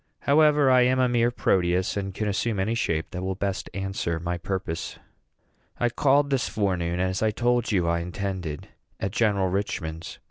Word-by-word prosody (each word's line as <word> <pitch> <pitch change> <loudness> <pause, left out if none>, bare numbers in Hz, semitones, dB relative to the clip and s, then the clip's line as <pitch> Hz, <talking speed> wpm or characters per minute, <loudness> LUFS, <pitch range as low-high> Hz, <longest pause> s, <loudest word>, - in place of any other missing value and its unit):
However, 150 -1 +4
I 125 -1 +6
am 125 +1 +3
a 130 - +4
mere 120 -1 +2
Proteus, 90 -5 +1
and 95 -1 -3
can 105 +3 -3
assume 105 +1 -1
any 100 +4 0
shape 80 -9 -1
that 90 - -5
will 95 0 -2
best 100 0 -3
answer 95 -4 -2
my 85 +1 -2
purpose. 90 -2 -4 0.8
I 120 - +2
called 140 +3 +2
this 135 -2 +1
afternoon, 90 -5 -1
as 95 0 -1
I 110 - +3
told 120 +2 0
you 90 -5 +1
I 85 0 +1
intended, 90 -3 -4 0.3
at 100 - -2
General 100 -4 +1
Richman's. 85 -4 -4
95 Hz, 175 wpm, -25 LUFS, 90-120 Hz, 0.8 s, I